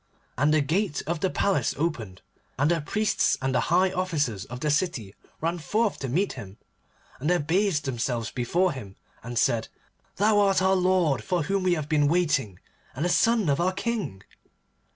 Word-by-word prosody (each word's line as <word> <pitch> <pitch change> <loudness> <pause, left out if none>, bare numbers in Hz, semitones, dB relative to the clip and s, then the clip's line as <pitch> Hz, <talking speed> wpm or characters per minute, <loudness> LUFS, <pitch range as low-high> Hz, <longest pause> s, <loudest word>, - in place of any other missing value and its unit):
And 145 +5 +2
the 155 -1 +4
gate 170 +3 -1
of 170 +1 -2
the 190 - 0
palace 200 +1 0
opened, 115 - -3 0.3
and 145 +5 +2
the 170 -2 +1
priests 215 +8 +1
and 135 0 -1
the - - +3
high 185 +3 +3
officers 155 - -1
of 125 +2 -8
the 150 - +1
city 145 - -1 0.3
ran 170 +2 -1
forth 215 +6 0
to 135 - -4
meet 185 +10 0
him, 100 -6 -10 0.6
and 150 +5 -1
they 180 - +4
abased 175 0 +1
themselves 120 -3 -2
before 175 +10 +1
him, 105 -8 -8 0.3
and 120 0 -6
said, 115 -2 +2 0.5
'Thou 210 +1 +3
art 195 -2 +3
our 190 +1 +3
lord 180 -9 +2
for 175 +6 0
whom 195 +5 0
we 180 -1 +2
have 155 -3 -4
been 150 -2 +2
waiting, 145 - +1 0.4
and 150 +6 -2
the - - +1
son 225 +1 +3
of 140 +2 +1
our 185 +2 +1
King. 200 - -3
160 Hz, 185 wpm, -26 LUFS, 130-185 Hz, 0.6 s, the